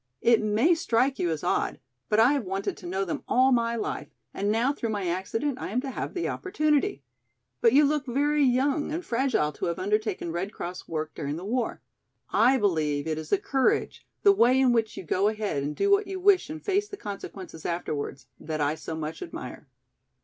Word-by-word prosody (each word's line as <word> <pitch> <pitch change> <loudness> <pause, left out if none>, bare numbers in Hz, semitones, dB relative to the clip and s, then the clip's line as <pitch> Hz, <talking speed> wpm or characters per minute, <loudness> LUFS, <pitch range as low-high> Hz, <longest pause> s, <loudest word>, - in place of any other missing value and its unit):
"It 230 -2 +5
may 215 +10 +3
strike 265 -4 +1
you 175 - +1
as 160 -2 -3
odd - - 0 0.3
but 210 - +3
I 240 +5 +6
have 280 -4 0
wanted 195 +1 -3
to 180 - -9
know 190 +2 -1
them 170 - -3
all 260 +2 +4
my 235 -1 +2
life 225 - -3 0.3
and 200 +1 0
now 235 +6 +2
through 235 -5 -3
my 205 -3 -2
accident 215 +10 -2
I - - -4
am 230 +6 0
to 270 0 -5
have - - -5
the 350 - -1
opportunity. 305 - 0 0.6
But 230 - +5
you 290 +2 +6
look 290 -1 0
very 290 +4 +2
young 275 +4 +2
and 335 +3 -3
fragile 235 - +1
to - - -5
have 170 - -2
undertaken 205 -3 -1
Red 185 +5 -3
Cross 180 +1 -6
work 155 -1 -3
during 145 -2 -4
the 175 +4 -7
war. 240 +2 -2 0.5
I 250 +5 +5
believe 155 - 0
it 155 -1 -2
is 155 - -8
the - - +4
courage, 285 -10 0 0.2
the 400 - +8
way 255 -8 +4
in 260 -2 +4
which 225 -2 0
you - - -5
go 185 +4 +1
ahead 210 -9 -1
and 145 +2 -3
do 400 - +1
what 400 0 +4
you 385 -1 -4
wish 380 -3 +4
and 315 0 -7
face 405 +1 +1
the 405 - -8
consequences 195 - -8
afterwards, 150 -5 -3
that 155 0 -4
I 145 0 +1
so 160 0 -6
much 155 0 -5
admire." 365 - -8
225 Hz, 210 wpm, -27 LUFS, 175-280 Hz, 0.6 s, the